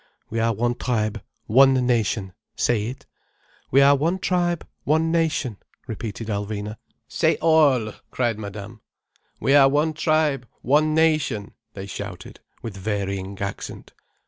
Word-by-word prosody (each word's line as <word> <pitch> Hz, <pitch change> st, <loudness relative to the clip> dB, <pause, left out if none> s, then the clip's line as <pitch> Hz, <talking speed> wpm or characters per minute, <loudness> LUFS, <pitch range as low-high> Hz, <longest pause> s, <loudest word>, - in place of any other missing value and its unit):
"We 115 Hz, -, -1 dB
are 115 Hz, +1 st, +2 dB
one 120 Hz, +3 st, 0 dB
tribe, 110 Hz, -4 st, -1 dB, 0.2 s
one 135 Hz, +4 st, +6 dB
nation—say 110 Hz, -2 st, 0 dB
it." 130 Hz, +3 st, -8 dB, 0.6 s
"We 135 Hz, -, +5 dB
are 140 Hz, +1 st, +6 dB
one 165 Hz, +6 st, 0 dB
tribe, 175 Hz, -2 st, 0 dB, 0.2 s
one 160 Hz, +2 st, +2 dB
nation," 160 Hz, -9 st, 0 dB, 0.3 s
repeated 115 Hz, -1 st, -6 dB
Alvina. 105 Hz, 0 st, -3 dB, 0.3 s
"Say -, -, +2 dB
all," 145 Hz, -9 st, +3 dB, 0.2 s
cried 120 Hz, -4 st, -1 dB
Madame. 105 Hz, +1 st, -8 dB, 0.6 s
"We 135 Hz, -, +2 dB
are 140 Hz, -1 st, +7 dB
one 150 Hz, +3 st, +1 dB
tribe, 155 Hz, -5 st, +1 dB, 0.2 s
one 155 Hz, +4 st, +3 dB
nation—" 155 Hz, -10 st, +1 dB, 0.2 s
they 95 Hz, -1 st, -6 dB
shouted, 100 Hz, -2 st, -8 dB, 0.2 s
with 115 Hz, -4 st, -6 dB
varying 100 Hz, -1 st, -3 dB
accent. 100 Hz, 0 st, -6 dB
120 Hz, 125 wpm, -23 LUFS, 105-150 Hz, 0.6 s, are